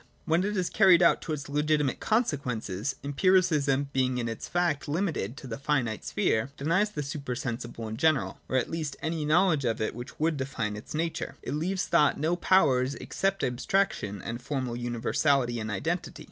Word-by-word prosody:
When 165 +3 +2
it 205 +1 -1
is 180 -2 -1
carried 185 -4 +6
out 170 - +4
to - - -5
its 150 -1 -5
legitimate 150 -1 +1
consequences. 130 - -1
Empiricism 145 -3 +2
— - - -37
being 130 -1 +1
in 120 -1 -1
its 115 -1 -5
facts 175 -5 0
limited 150 - -2
to 140 - -9
the 115 -2 -6
finite 130 -6 0
sphere 110 +4 0
— - - -36
denies 175 +9 +2
the 170 -8 -4
super 140 -3 -4
sensible 120 -3 -5
in 110 +1 -5
general, 135 -10 +1
or 130 - +1
at 125 - +1
least 155 -4 -3
any 160 -1 -1
knowledge 160 -1 +3
of 115 -3 0
it 110 - -1
which 120 +1 -9
would 160 0 +1
define 130 -6 -3
its 105 +7 -8
nature; 165 +1 -2
it 130 - -4
leaves 180 +5 -1
thought 150 -5 +3
no 160 +4 +1
powers 140 -8 +3
except 195 -2 -2
abstraction 125 - 0
and 120 +1 -5
formal 130 -2 -3
universality 120 +1 +1
and 110 0 -4
identity. 100 -3 -3
140 Hz, 190 wpm, -28 LUFS, 120-165 Hz, -, carried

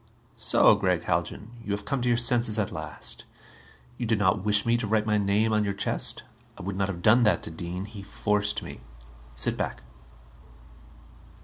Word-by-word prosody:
"So, - - +4
Gregg 95 -4 0
Haljan? 105 +3 -2
You 100 - -3
have 105 0 -4
come 140 +2 -1
to 125 - -1
your 120 -1 +3
senses 120 -2 +3
at 105 -3 -1
last. - - -8 0.7
You 120 - -2
do 110 - +2
not 95 -2 +1
wish 105 -1 +4
me 115 0 +3
to 120 -3 -3
write 110 0 +1
my 105 -1 +2
name 105 +2 +1
on 105 0 +2
your 100 -1 -2
chest? 100 - -2 0.3
I - - -9
would 100 +1 -4
not 95 0 0
have 90 -3 -6
done 115 +3 +6
that 110 -3 +2
to - - -6
Dean; 90 +3 -5
he 105 -1 -10
forced 105 +1 -1
me. - - -9 0.5
Sit 65 - +2
back." - - -4
105 Hz, 190 wpm, -27 LUFS, 100-110 Hz, 0.7 s, done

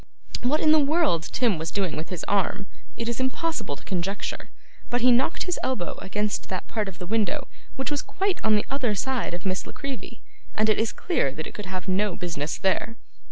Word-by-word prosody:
What 285 +6 +2
in 310 - +6
the 310 - +7
world 290 - +3
Tim 230 -9 +2
was 160 0 -2
doing 190 -3 0
with 160 +2 -4
his 180 -3 -4
arm, 200 0 +1 0.3
it 230 - -2
is 235 +1 -1
impossible 260 - 0
to - - -15
conjecture, 190 +1 -2 0.4
but 245 0 +1
he 250 +1 +7
knocked 250 +7 +3
his 360 -1 -1
elbow 210 -10 -1
against 210 +2 -1
that 185 -1 -3
part 215 -2 -1
of 190 -3 -7
the 180 - -6
window 225 +8 +1 0.3
which 265 +2 -2
was 290 - +1
quite 390 -1 -1
on 220 -1 +5
the 210 - +2
other 255 -6 +1
side 250 -2 0
of 175 - -8
Miss 185 -1 -1
La - - -8
Creevy; 275 -2 -6 0.3
and 215 +1 +3
it 215 - +4
is 220 -1 +2
clear 325 - +1
that 155 +1 -5
it - - -7
could 210 -2 -6
have 185 0 -4
no 190 +1 +2
business 160 -4 -2
there. 215 +4 +1
210 Hz, 215 wpm, -26 LUFS, 185-260 Hz, 0.4 s, the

